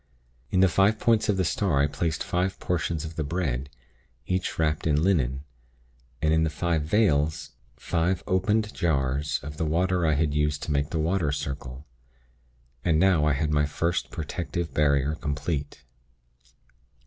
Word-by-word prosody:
In 95 - +2
the 95 - +7
five 100 +4 +3
points 115 -2 +2
of 100 - +2
the 95 - +1
star 85 -4 +1
I 70 - +4
placed 75 +2 -2
five 90 +2 -1
portions 85 -3 -2
of 80 +1 -8
the 80 - 0
bread, 70 -5 -2 0.6
each 90 +2 -2
wrapped 75 -1 0
in 75 0 +2
linen, 70 -8 +1 0.8
and 80 0 +3
in 80 0 +3
the 80 - +1
five 80 +1 -1
'vales,' 75 -3 +1 0.3
five 85 +6 -1
opened 105 +4 +1
jars 75 -3 0
of 75 +1 -7
the 80 - -1
water 90 +1 +1
I 80 - +3
had 75 0 +1
used 75 0 0
to - - -3
make 70 0 0
the 80 - -2
'water 80 -1 +1
circle.' 70 -2 -5 1.0
And 80 -3 +2
now 90 -4 +4
I 75 - +3
had 75 +2 -1
my 75 0 +2
first 85 +3 -1
protective 85 0 -4
barrier 70 -1 +2
complete. 75 -1 -4
80 Hz, 160 wpm, -26 LUFS, 75-90 Hz, 1.0 s, the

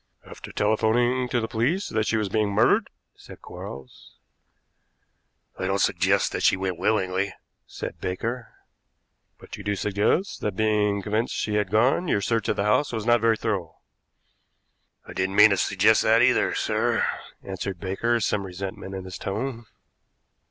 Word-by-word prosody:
"After - - -10
telephoning 120 +4 +1
to 120 - +1
the 110 - -2
police 135 - 0
that 110 -1 -1
she 115 - +1
was 105 -2 0
being 105 +1 0
murdered?" 100 +2 +3 0.3
said - - -14
Quarles. 65 -1 -11 1.4
"I 95 - -1
don't 95 +1 +1
suggest 95 0 +2
that - - -3
she - - +4
went 95 -2 -3
willingly," 95 -2 0 0.3
said - - -7
Baker. 115 +6 -4 0.9
"But - - -11
you 105 - -9
do 100 0 -1
suggest 105 - 0
that, 105 -3 -2
being 105 -1 +1
convinced 110 +3 -1
she 105 - -2
had 105 -2 0
gone, 125 - +2
your 100 - +2
search 115 +1 -1
of - - +1
the 100 - -1
house 105 +8 +2
was 110 -3 -4
not 120 -1 +4
very 115 -1 +3
thorough?" 95 -9 -3 1.3
"I - - -10
didn't 95 +1 -1
mean 110 - +8
to 100 - +2
suggest - - +3
that, - - +4
either, - - +3
sir," - - +1 0.4
answered 95 -1 -5
Baker, 115 +6 0
some 105 -2 0
resentment 95 +1 -6
in 95 -1 -6
his 95 - -8
tone. 115 +3 -4
105 Hz, 160 wpm, -25 LUFS, 95-115 Hz, 1.4 s, mean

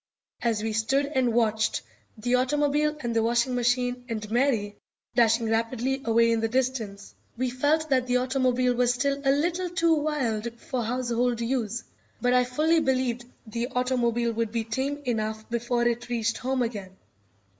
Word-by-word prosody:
As 225 -3 0
we 220 -1 -1
stood 230 +6 +1
and 260 -4 +1
watched 220 -2 +1 0.3
the 245 +3 -1
automobile 295 +3 +2
and 235 -2 -2
the 225 - +3
washing 235 +2 +1
machine 245 0 0
and 215 -2 -4
Mary 230 -5 +1 0.4
dashing 230 -1 +3
rapidly 235 +4 0
away 230 0 +4
in 230 - +2
the 225 - +1
distance, 230 -5 -2 0.2
we 255 0 -1
felt 295 +5 +1
that 255 -1 +2
the 250 0 +3
automobile 255 -1 +1
was 245 0 +2
still 280 +2 0
a 270 - +2
little 345 +6 +1
too 335 -2 +2
wild 240 -7 -1
for 250 0 -3
household 240 0 0
use, 230 -2 -2 0.4
but 245 0 +2
I 250 0 +4
fully 310 +6 +2
believed 255 -4 0 0.2
the 235 +2 -3
automobile 240 -2 +1
would 230 -1 -2
be 230 -1 -1
tame 265 +6 -2
enough 220 -2 -2
before 240 0 0
it 240 0 -2
reached 230 -2 0
home 260 0 0
again. 200 -5 -5
245 Hz, 165 wpm, -26 LUFS, 230-260 Hz, 0.4 s, away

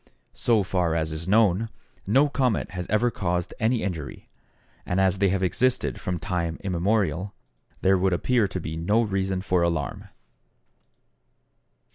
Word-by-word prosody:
So 115 -4 +2
far 90 -3 0
as 80 -1 -1
is 80 +2 -5
known, 105 +1 +3 0.4
no 135 +8 +4
comet 130 -6 0
has 90 -1 -5
ever 115 +3 +2
caused 90 -4 -2
any 115 +1 +1
injury, 80 -9 -5 0.5
and 90 - -1
as 95 0 +2
they 100 -1 +3
have 95 0 0
existed 95 - 0
from 90 -1 -2
time 85 -1 -2
immemorial, 95 -1 0 0.5
there 95 0 +4
would 95 +1 +2
appear 110 +5 +2
to 95 0 -4
be 80 -2 -5
no 105 +8 +2
reason 95 -3 -1
for 90 -2 +1
alarm. 85 -4 -1
95 Hz, 145 wpm, -25 LUFS, 85-105 Hz, 0.5 s, no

